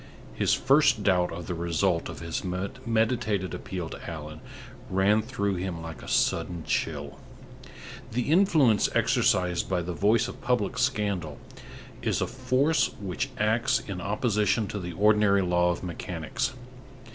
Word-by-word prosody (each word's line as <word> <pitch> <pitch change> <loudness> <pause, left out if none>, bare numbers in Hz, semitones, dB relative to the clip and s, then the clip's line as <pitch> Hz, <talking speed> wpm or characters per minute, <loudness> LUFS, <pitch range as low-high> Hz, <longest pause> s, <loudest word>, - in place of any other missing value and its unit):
His - - +2
first 135 -5 +3
doubt 90 -3 +2
of 85 +1 -6
the 90 - -3
result 85 +1 0
of - - -8
his 85 -1 -4
meditated 110 +1 -1
appeal 90 -3 -5
to - - -8
Allan 75 -1 -7 0.5
ran 100 +3 +3
through 105 -5 -2
him 90 -2 -4
like 80 -1 -8
a - - -11
sudden 85 -2 0
chill. 70 -3 -2 0.9
The 125 +5 -1
influence 155 - +4
exercised 90 -2 +2
by 90 -2 0
the 90 +1 -4
voice 105 +5 +2
of - - -9
public 125 -1 0
scandal 100 - -1 0.6
is - - 0
a - - +1
force 130 +4 +1
which 100 +7 -3
acts 110 +3 +2
in 95 -3 -6
opposition 105 +1 +1
to 105 - -4
the 90 -2 -6
ordinary 105 0 +4
law 90 0 +2
of 85 - -2
mechanics. 90 +6 -3
100 Hz, 145 wpm, -27 LUFS, 90-115 Hz, 0.9 s, influence